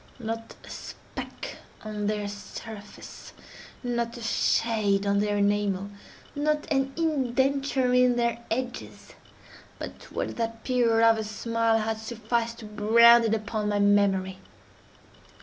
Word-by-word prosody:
Not 225 -1 -5
a - - -13
speck - - -8 0.3
on 210 -1 -3
their 210 -1 -1
surface—not 225 +3 -7
a - - -9
shade 215 -3 +1
on 200 0 +2
their 205 0 0
enamel—not 205 +9 -1
an 270 -1 +1
indenture 270 -3 +1
in 250 -1 +4
their 235 -1 0
edges—but 245 +2 -7 0.2
what - - -3
that 230 -1 -3
period 230 -3 +3
of 225 0 +5
her 220 - -2
smile 225 +1 0
had 220 0 -2
sufficed 230 +1 -2
to 225 - -10
brand 230 +3 +6
in 225 0 +2
upon 215 -1 -2
my 205 - +1
memory. 200 -2 +2
225 Hz, 115 wpm, -27 LUFS, 210-240 Hz, 0.3 s, brand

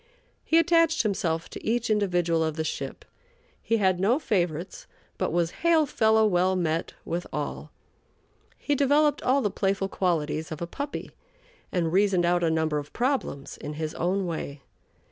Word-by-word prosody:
He 325 - +3
attached 330 -2 +4
himself 165 -6 -1
to - - -8
each 230 0 0
individual 175 -5 +1
of 160 -1 -1
the 160 - -1
ship. - - -5 0.6
He 230 - +1
had 190 -3 +2
no 215 +7 +3
favorites, 180 - -2 0.3
but - - 0
was 170 -1 +1
hail 330 -2 +4
fellow 220 -4 +3
well 185 -2 +2
met 165 -2 -1
with 175 +1 -3
all. - - -4 0.9
He 290 - -1
developed 290 +2 +3
all 270 +2 +2
the 205 - 0
playful 195 0 0
qualities 160 -4 -1
of 155 - -5
a 170 - -2
puppy 280 +11 -6 0.6
and 170 -2 0
reasoned 190 -2 +3
out 175 0 +2
a 165 - +3
number 160 -2 +1
of 145 0 -10
problems 245 - -2
in 150 - -6
his 155 0 -4
own 185 +3 0
way. 150 -4 -5
185 Hz, 165 wpm, -26 LUFS, 165-230 Hz, 0.9 s, attached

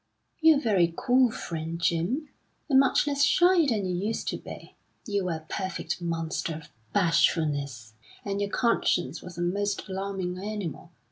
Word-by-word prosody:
"You're 320 -3 +6
very 195 -10 +2
cool, 255 -1 +4
friend 165 -5 -5
Jim 175 - 0 0.4
and 270 -3 +5
much 270 +1 +3
less 285 -1 +1
shy 350 +2 +5
than 210 -5 0
you 180 -1 -1
used 225 - -3
to - - -3
be. - - -10 0.3
You 200 -3 -1
were 175 -2 -1
a 160 0 -9
perfect 190 -1 -3
monster 165 -1 -2
of 150 -1 -10 0.2
bashfulness, 145 - +1 0.3
and 200 0 -2
your 200 - -1
conscience 200 - +1
was 180 -1 -10
a 175 - -1
most 200 +4 -1
alarming 190 -2 -3
animal. 195 -5 -5
190 Hz, 155 wpm, -27 LUFS, 165-230 Hz, 0.4 s, You're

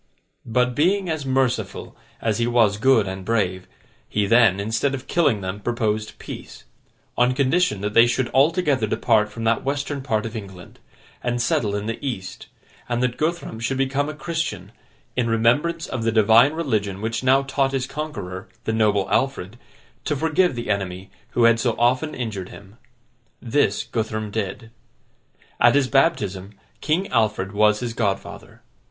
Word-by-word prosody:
But, 125 +2 +1
being 180 +5 +1
as 150 -4 -3
merciful 130 -2 -1 0.3
as 110 -1 0
he 120 - +1
was 115 -4 +3
good 115 -3 +3
and 95 0 -5
brave, 95 -4 -1 0.4
he 105 -1 0
then, 110 -3 +4
instead 115 +7 0
of 130 0 -8
killing 135 -12 +1
them, 95 +2 -4
proposed 110 -1 -2
peace: - - -9 0.5
on 125 +1 +2
condition 135 - +1
that 105 +1 -2
they 115 +2 +7
should 120 +1 0
altogether 145 -4 +2
depart 105 0 +2
from 115 +1 -7
that 115 0 +1
Western 140 +1 -2
part 110 -5 -1
of 115 +1 -6
England, 95 -4 -9 0.4
and 120 0 -1
settle 110 -3 0
in 105 0 -3
the 115 +5 -5
East; 100 -9 -5 0.4
and 120 +1 0
that 125 -1 0
Guthrum 155 -5 -2
should 115 +4 -2
become 135 +2 0
a 155 - -6
Christian, 165 +1 -4 0.4
in 125 -2 0
remembrance 145 +9 +2
of 130 - -4
the 115 0 +1
Divine 115 +5 +5
religion 110 - -1
which 115 +3 -3
now 135 +1 +4
taught 135 0 0
his 135 -2 -1
conqueror, 105 -11 -6 0.2
the 110 - -2
noble 105 -3 +2
Alfred, 125 -7 0 0.5
to 150 - 0
forgive 160 +2 +1
the 120 -2 -3
enemy 95 -1 -3 0.2
who 120 - +2
had 115 0 +5
so 115 -1 0
often 130 +6 +1
injured 105 -7 -4
him. 100 +2 -14 0.6
This, 130 +4 +1
Guthrum 110 -1 -3
did. 110 +2 -4 0.9
At - - +5
his 140 -2 +3
baptism, 105 - +1 0.3
King 175 +6 0
Alfred 105 -5 0
was 105 +1 +3
his 120 -2 -3
godfather. 100 -4 -4
115 Hz, 160 wpm, -22 LUFS, 105-135 Hz, 0.9 s, they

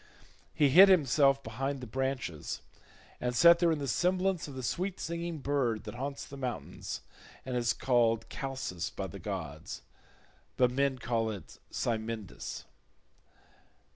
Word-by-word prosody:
He 145 -2 +4
hid 190 +8 +9
himself 140 -5 +4
behind 135 +5 -3
the 125 - -6
branches 130 - -3 0.6
and 125 0 -1
sat 170 +5 +8
there 170 -2 +4
in 160 - +1
the 140 -1 -3
semblance 180 +4 +1
of 140 - -9
the 130 - -5
sweet 185 +8 -2
singing 170 0 -3
bird 135 -6 0
that - - -7
haunts 140 +3 -4
the 140 - -10
mountains 130 -3 -5 0.4
and 130 -1 -3
is 120 -1 +2
called 115 -3 +2
Chalcis 130 -11 -4
by - - -5
the - - -8
gods, - - -5 0.7
but 125 -1 +4
men 135 +1 +1
call 115 -2 0
it 105 -4 -8
Cymindis. 110 -3 -3
135 Hz, 140 wpm, -31 LUFS, 120-150 Hz, 0.7 s, hid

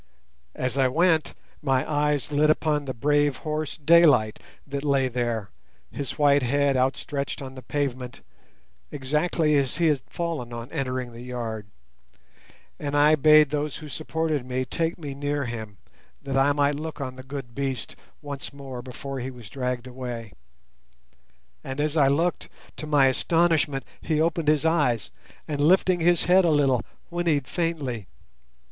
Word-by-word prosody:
As 130 +1 -2
I 130 - +5
went, 160 +3 +2 0.3
my 135 -1 +1
eyes 150 -1 0
lit 150 +1 +3
upon 150 -1 +1
the 130 - -3
brave 145 +2 +2
horse 155 0 -3
Daylight 150 -8 +5 0.3
that 140 0 -4
lay 140 -2 +2
there, 120 -4 -2 0.4
his 140 -2 -5
white 145 -1 +4
head 140 +2 +2
outstretched 135 +2 -1
on 130 -1 -7
the 130 - -9
pavement, 130 -2 -3 0.7
exactly 150 +3 +1
as 140 0 0
he 165 -2 +3
had 145 -4 +1
fallen 165 -8 -3
on 115 0 -7
entering 130 -4 -3
the 115 0 -10
yard; 115 -4 -5 1.1
and 145 -1 -2
I 150 +1 +6
bade 155 -1 +6
those 150 -1 -2
who 155 - -8
supported 155 -1 -2
me 130 +1 -2
take 165 +4 -2
me 145 -5 -6
near 145 0 -2
him, 110 -4 -6 0.5
that 135 -1 -3
I 135 +1 +4
might 145 0 +2
look 160 0 -6
on 130 -2 -4
the 130 - -9
good 130 -2 -7
beast 135 -3 -3 0.3
once 140 -2 -6
more 135 -3 -8
before 130 +2 -6
he 130 +1 -4
was 120 -6 -12
dragged 125 -2 -3
away. 125 -4 -6 1.3
And 135 +1 -5
as 150 +1 0
I 145 -4 +5
looked, 165 +6 0 0.3
to 155 - -6
my 145 -3 +4
astonishment 160 +1 +2 0.2
he 155 -2 0
opened 165 -1 0
his 150 0 +3
eyes 145 - +1 0.4
and, 145 -2 -2
lifting 180 +3 +4
his 170 0 +3
head 185 +2 +5
a 170 - +3
little, 140 -5 +3 0.3
whinnied 165 -6 0
faintly. 145 - -2
140 Hz, 155 wpm, -25 LUFS, 130-155 Hz, 1.3 s, I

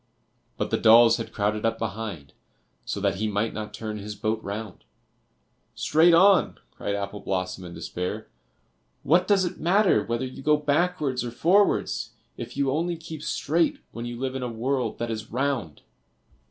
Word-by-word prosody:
But - - -2
the 115 - +1
dolls 115 0 +7
had 115 - -6
crowded 105 +1 -1
up 115 0 +1
behind, 105 -9 -5 0.5
so - - -3
that - - +1
he 110 +2 -1
might 105 +2 -1
not 105 0 -5
turn 110 -1 -5
his 105 +1 -6
boat 110 +2 -2
round. 100 -1 -6 0.9
"Straight 165 +2 +4
on," 190 0 +5
cried 100 - -3
Apple 100 0 -4
blossom, 95 -1 -3
in 85 - -9
despair; 90 0 -5 0.8
"what 175 +5 +3
does 195 -3 +3
it 175 - -5
matter 195 +4 +3
whether 115 +2 -2
you 130 - -8
go 150 +2 +3
backwards 150 -3 0
or 120 - -3
forwards 180 - +2 0.2
if 120 +2 -8
you 140 -1 +1
only 170 +4 -1
keep 160 -2 -8
straight 160 +2 0
when 115 0 -6
you 120 0 -6
live 130 0 -2
in 130 - -4
a 125 - -3
world 125 +3 -2
that 120 0 -3
is 110 0 -5
round?" 125 - -2
120 Hz, 170 wpm, -25 LUFS, 105-150 Hz, 0.9 s, dolls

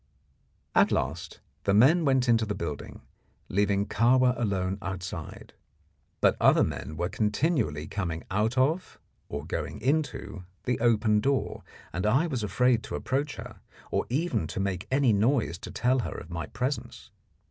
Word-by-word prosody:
At - - +4
last 80 +6 -2 0.2
the 100 - +3
men 155 +10 +5
went 130 -2 +3
into 115 -1 +4
the 105 -1 -2
building, 75 -4 -6 0.5
leaving 100 +1 +1
Kahwa 125 +4 +3
alone 95 -4 -1
outside; 90 -4 -6 0.7
but - - +4
other - - +6
men 75 +3 -4
were 85 +1 0
continually 105 - 0
coming 85 -2 -3
out 110 +5 0
of, 155 +8 +1 0.3
or 70 - -5
going - - -4
into, 135 -7 -1 0.2
the 125 -1 -1
open 110 -2 +3
door, 135 +4 0 0.3
and 90 +5 -1
I 135 +10 +3
was 135 -8 -2
afraid 120 +3 +2
to - - -5
approach 140 +2 -2
her, - - -9 0.3
or - - 0
even 145 - 0
to - - -5
make 95 -2 -2
any 130 -3 +3
noise 110 -4 +1
to - - -8
tell 130 +1 +1
her - - -4
of 80 - -9
my 85 -1 -4
presence. 125 +6 -4
110 Hz, 155 wpm, -28 LUFS, 95-130 Hz, 0.7 s, other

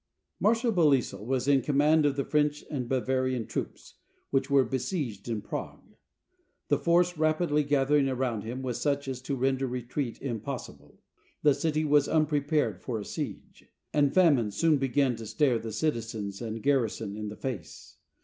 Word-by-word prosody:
\ - - -53
Marshal 230 +2 +2
Belleisle 140 - +2
was 130 +3 -1
in 140 -2 +4
command 150 +3 +3
of 140 - 0
the 140 - 0
French 150 0 0
and 125 -5 -3
Bavarian 130 -2 0
troops, 110 - -6 0.4
which 135 - +1
were 140 -2 +4
besieged 125 - -3
in 110 -3 -2
Prague. - - -7 0.7
The - - +3
force 175 0 +2
rapidly 155 -1 +2
gathering 140 0 +2
around 125 -4 -1
him 120 +5 -5
was 125 -3 -3
such 140 -1 0
as 130 -1 -4
to 135 +2 -3
render 135 +1 0
retreat 125 0 -4
impossible. 115 - -6 0.4
The 150 -2 +6
city 155 +1 0
was 145 -1 +4
unprepared 150 - +1
for 120 -3 -3
a 105 - -6
siege, - - -6 0.3
and 145 -2 +3
famine 145 - +4
soon 155 +8 +2
began 135 -1 +1
to 110 -1 -8
stare 130 -1 +2
the 110 0 -6
citizens 110 -5 -3
and 115 -1 -5
garrison 120 -7 0
in 105 0 -5
the 105 - -9
face. 100 -12 -7
135 Hz, 165 wpm, -28 LUFS, 115-150 Hz, 0.7 s, The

